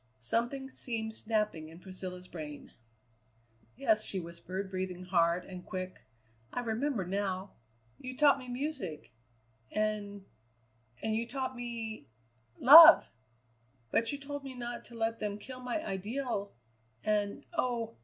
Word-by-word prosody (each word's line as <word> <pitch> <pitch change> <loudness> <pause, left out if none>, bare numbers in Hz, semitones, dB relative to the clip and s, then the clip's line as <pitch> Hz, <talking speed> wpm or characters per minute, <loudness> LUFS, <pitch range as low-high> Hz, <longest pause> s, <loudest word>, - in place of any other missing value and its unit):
Something 240 - 0
seemed 225 -4 -3
snapping 210 -8 -2
in 165 +1 -13
Priscilla's 185 -1 -8
brain. 150 -4 -8 1.0
"Yes," 215 - +3
she 195 - +8
whispered, 180 +3 -6
breathing 185 -1 -4
hard 175 -1 +2
and 180 -1 -9
quick. 185 0 -6 0.5
"I - - -2
remember 235 -2 -1
now: 190 0 -2 0.5
you 255 0 -7
taught 285 -2 +5
me 255 - -10
music, 245 - -5 0.6
and 205 -2 -2 0.8
and 220 0 0
you 230 +1 -1
taught 260 0 -3
me 230 - -6 0.5
love, 320 +5 +10 0.8
but 230 - +1
you 285 - -3
told 285 0 -7
me 265 -1 -8
not 240 -1 -6
to 235 - -13
let 225 0 -1
them 205 -1 -3
kill 255 +4 -9
my 250 +5 -3
ideal; 205 +1 -3 0.5
and, 205 -1 -1
oh! 240 - -1
215 Hz, 130 wpm, -31 LUFS, 185-250 Hz, 1.0 s, love